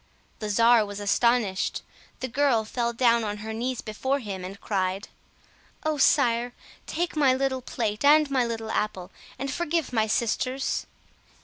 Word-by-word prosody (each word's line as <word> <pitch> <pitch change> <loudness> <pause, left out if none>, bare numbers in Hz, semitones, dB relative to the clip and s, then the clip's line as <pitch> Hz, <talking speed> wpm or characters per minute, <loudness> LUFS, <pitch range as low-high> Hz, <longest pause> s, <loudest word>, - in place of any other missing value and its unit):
The 215 - -4
czar 230 +2 +5
was 205 0 -6
astonished. 205 -1 +1 0.4
The 260 - -2
girl 255 -3 +2
fell 235 +1 -1
down 235 -1 +3
on 210 -1 -3
her 220 - -4
knees 245 +2 -2
before 260 +6 -1
him, 200 -8 -6
and 195 +2 -8
cried— 190 0 -2 0.7
"Oh, 310 -1 -1
Sire, 245 -3 +3 0.3
take 345 0 -2
my 275 -4 +4
little 260 -1 -1
plate 220 -3 -3
and 300 +1 +6
my 260 -2 +3
little 225 -1 -4
apple, 195 -3 -2 0.3
and 270 +1 -3
forgive 330 -5 -1
my 220 -2 +2
sisters!" 255 +4 -1
235 Hz, 150 wpm, -26 LUFS, 215-265 Hz, 0.7 s, and